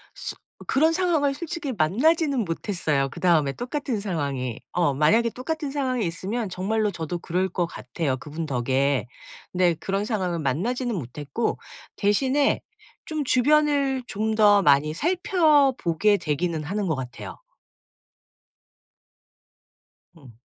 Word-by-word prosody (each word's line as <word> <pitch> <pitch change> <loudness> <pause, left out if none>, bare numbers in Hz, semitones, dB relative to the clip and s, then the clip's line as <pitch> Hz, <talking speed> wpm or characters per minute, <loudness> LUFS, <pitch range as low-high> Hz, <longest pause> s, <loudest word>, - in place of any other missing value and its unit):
슥 - - -6 0.3
그런 315 +4 +3
상황을 325 -6 +1
솔직히 325 -1 -5
만나지는 265 - +2
못했어요 165 -5 -1
그다음에 155 -2 +2
똑같은 250 - -3
상황이. 140 - -3
어 170 -6 +2
만약에 215 - +3
똑같은 295 +2 -4
상황이 255 -6 -1
있으면 195 +6 -3
정말로 210 +3 0
저도 170 0 -4
그럴 180 +3 -1
것 175 0 -1
같아요 135 -2 -3
그분 150 +5 -6
덕에. 135 0 0 0.4
근데 180 -2 +3
그런 195 +5 -2
상황을 185 -6 -1
만나지는 225 - -1
못했고 145 - -3 0.4
대신에 260 +8 +2 0.4
좀 310 -2 -2
주변을 280 0 +2
좀 220 +2 -2
더 205 -2 +6
많이 145 0 +4
살펴 320 - +3
보게 200 +5 +2
되기는 160 +1 -2
하는 195 +5 -2
것 160 - +1
같아요. 130 - -8 2.8
음. 135 -6 -15
200 Hz, 275 characters per minute, -24 LUFS, -, 2.8 s, 더